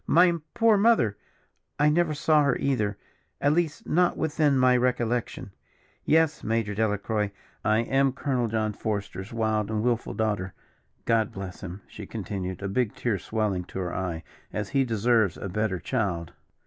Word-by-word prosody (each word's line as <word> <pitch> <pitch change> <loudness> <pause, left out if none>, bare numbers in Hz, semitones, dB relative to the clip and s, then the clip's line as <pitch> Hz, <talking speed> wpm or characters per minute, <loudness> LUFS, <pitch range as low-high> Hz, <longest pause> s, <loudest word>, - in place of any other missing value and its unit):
"My 175 +2 +5 0.2
poor 225 -2 +5
mother, 200 - +4 0.6
I 150 +1 +4
never 155 0 +2
saw 155 0 +3
her 140 - +2
either, 110 -7 0 0.4
at 145 +1 +3
least 165 -2 -1
not 180 +2 +2
within 150 -3 +2
my 130 -1 +5
recollection. 120 -4 -1 0.5
Yes, 160 -1 +3
Major 110 -1 0
Delacroix, 105 0 0 0.3
I 110 +1 +3
am 135 +3 +2
Colonel 130 -3 -1
John 110 -1 -1
Forester's 100 -2 -4
wild 110 -2 0
and 110 -1 -1
wilful 120 -1 0
daughter. 105 -4 -1 0.5
God 115 -2 +2
bless 95 -2 -7
him," 95 +2 -7
she - - -10
continued, 95 -1 -5
a - - -1
big 105 +2 0
tear 110 -6 -1
swelling 105 -2 -1
to - - -9
her 90 -2 -3
eye, 85 -3 -3 0.3
"as 105 -1 -3
he 135 -1 +2
deserves 115 -3 +2
a - - -5
better 105 0 -1
child." 95 -10 -2
110 Hz, 160 wpm, -26 LUFS, 100-135 Hz, 0.6 s, My